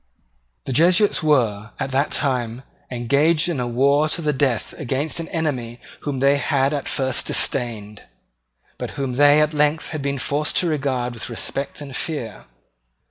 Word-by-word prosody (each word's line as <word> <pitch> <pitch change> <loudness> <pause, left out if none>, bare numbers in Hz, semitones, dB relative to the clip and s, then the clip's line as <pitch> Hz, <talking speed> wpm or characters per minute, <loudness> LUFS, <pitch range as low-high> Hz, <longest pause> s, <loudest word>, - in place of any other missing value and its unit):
The 130 - -3
Jesuits 180 - +4
were, 115 -9 +1
at 135 - -3
that 140 +3 +1
time, 125 -3 -1 0.3
engaged 140 +7 +2
in 160 -6 -2
a 125 - -1
war 140 +5 +2
to 170 - -1
the 150 -1 +1
death 130 -5 0
against 140 +3 -1
an 165 - -4
enemy 130 -9 -3 0.2
whom 145 -2 -4
they 140 +1 +4
had 140 -1 +1
at 145 -2 -3
first 130 -2 0
disdained, 110 -5 0 0.8
but - - -6
whom 135 -3 -2
they 145 +3 +5
had 150 0 +4
at - - -11
length 150 +2 0
been 140 0 -2
forced 145 +3 -1
to 180 - +2
regard 130 -5 -1
with 115 - -7
respect 135 +5 -4
and 140 -3 -8
fear. 135 -10 -4
140 Hz, 165 wpm, -21 LUFS, 125-150 Hz, 0.8 s, they